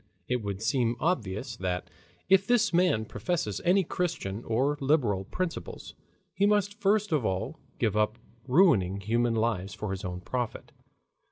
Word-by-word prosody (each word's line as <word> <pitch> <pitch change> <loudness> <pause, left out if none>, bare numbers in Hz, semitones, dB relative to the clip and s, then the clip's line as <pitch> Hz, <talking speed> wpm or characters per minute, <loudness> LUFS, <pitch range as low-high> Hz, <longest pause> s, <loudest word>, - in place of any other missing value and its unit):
It 125 -1 0
would 100 0 -4
seem 120 0 +1
obvious 120 - -1
that 90 -1 -2 0.4
if 195 +1 +4
this 235 -4 +3
man 170 -11 +3
professes 105 - -2
any 190 +2 +4
Christian 120 - -3
or 130 +6 +1
liberal 125 -10 +2
principles, 180 - -5 0.4
he 200 - +2
must 205 0 +1
first 205 0 +2
of 150 -5 +2
all 95 -3 -2 0.2
give 110 -3 0
up 105 +1 +1 0.3
ruining 125 - +4
human 115 +3 +1
lives 110 -4 -1
for 105 -2 -4
his 95 0 -4
own 90 -1 -4
profit. 120 +3 -4
120 Hz, 150 wpm, -28 LUFS, -, 0.4 s, if